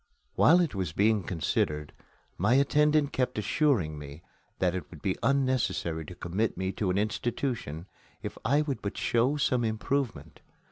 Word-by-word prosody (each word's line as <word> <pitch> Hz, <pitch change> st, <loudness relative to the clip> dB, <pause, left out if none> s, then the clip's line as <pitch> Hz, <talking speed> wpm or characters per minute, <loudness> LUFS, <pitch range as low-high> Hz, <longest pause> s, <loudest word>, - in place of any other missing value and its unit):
While 175 Hz, +4 st, +6 dB
it 170 Hz, -, 0 dB
was 95 Hz, -6 st, -3 dB
being 105 Hz, +2 st, +3 dB
considered, 75 Hz, -4 st, -1 dB, 0.4 s
my 105 Hz, +7 st, +2 dB
attendant 150 Hz, +1 st, +3 dB
kept 125 Hz, -3 st, -1 dB
assuring 105 Hz, -, +1 dB
me 75 Hz, +3 st, -10 dB, 0.3 s
that 90 Hz, -2 st, +1 dB
it 95 Hz, -, -5 dB
would 80 Hz, -4 st, -13 dB
be 95 Hz, -, +1 dB
unnecessary 120 Hz, -, 0 dB
to 90 Hz, -, -9 dB
commit 95 Hz, +6 st, -2 dB
me 95 Hz, +1 st, -1 dB
to 95 Hz, -1 st, -2 dB
an 90 Hz, -, +1 dB
institution 110 Hz, -, -2 dB, 0.4 s
if -, -, -5 dB
I 140 Hz, +7 st, +3 dB
would 135 Hz, -7 st, -3 dB
but 100 Hz, -, -4 dB
show 125 Hz, +5 st, +1 dB
some 125 Hz, -4 st, +1 dB
improvement. 110 Hz, -, -2 dB
110 Hz, 155 wpm, -29 LUFS, 90-135 Hz, 0.4 s, While